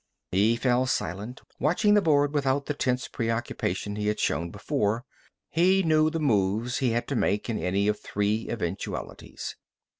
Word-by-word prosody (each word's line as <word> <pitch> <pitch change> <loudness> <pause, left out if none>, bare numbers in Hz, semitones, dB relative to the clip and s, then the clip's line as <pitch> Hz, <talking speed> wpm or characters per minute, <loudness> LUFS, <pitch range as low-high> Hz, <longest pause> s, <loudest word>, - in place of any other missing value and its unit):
He 105 +5 +3
fell 125 +1 +2
silent, 110 +2 -3 0.2
watching 205 - +3
the 205 - +5
board 145 -4 +3
without 140 -1 +1
the 145 - -1
tense 125 -3 -1
preoccupation 115 -4 -2
he 105 0 -1
had 105 - 0
shown 85 +1 0
before. 105 - -1 0.4
He 185 +4 +3
knew 155 -1 +4
the 165 +1 -3
moves 110 -3 +1
he 130 - +2
had 115 +1 -1
to 140 - -1
make 105 0 0
in 110 - -2
any 100 +3 0
of 105 0 +1
three 105 +2 -1
eventualities. 100 -4 -5
120 Hz, 160 wpm, -27 LUFS, 105-145 Hz, 0.4 s, the